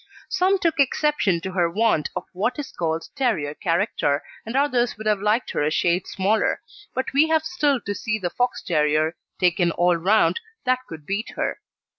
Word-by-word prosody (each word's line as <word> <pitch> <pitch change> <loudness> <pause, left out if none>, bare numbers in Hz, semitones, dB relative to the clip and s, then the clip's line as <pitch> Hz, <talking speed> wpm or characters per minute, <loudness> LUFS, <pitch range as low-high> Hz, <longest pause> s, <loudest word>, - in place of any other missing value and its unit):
Some 380 +2 +2
took 330 -4 0
exception 275 - +2
to 190 - -4
her 175 -2 +1
want 205 -4 +1
of - - -2
what 215 +7 -1
is 290 -2 -5
called 165 -1 -2
terrier 220 - 0
character, 165 -4 0 0.2
and 230 - -4
others 255 -5 +1
would 220 - -8
have 210 -2 +2
liked 215 +3 +1
her - - -1
a 150 - +2
shade 175 +3 +1
smaller; 205 +3 +1 0.4
but 260 +1 -2
we 290 +3 +5
have 320 -1 +2
still 300 -5 +1
to 205 - -3
see 215 +1 -2
the 180 -4 -3
Fox 245 0 -1
terrier, 155 0 +1 0.2
taken 175 -1 +3
all 175 +1 +2
round, 200 - +3 0.3
that 255 0 +2
could 155 -2 -9
beat 200 +6 -3
her. - - -2
205 Hz, 185 wpm, -23 LUFS, 170-255 Hz, 0.4 s, we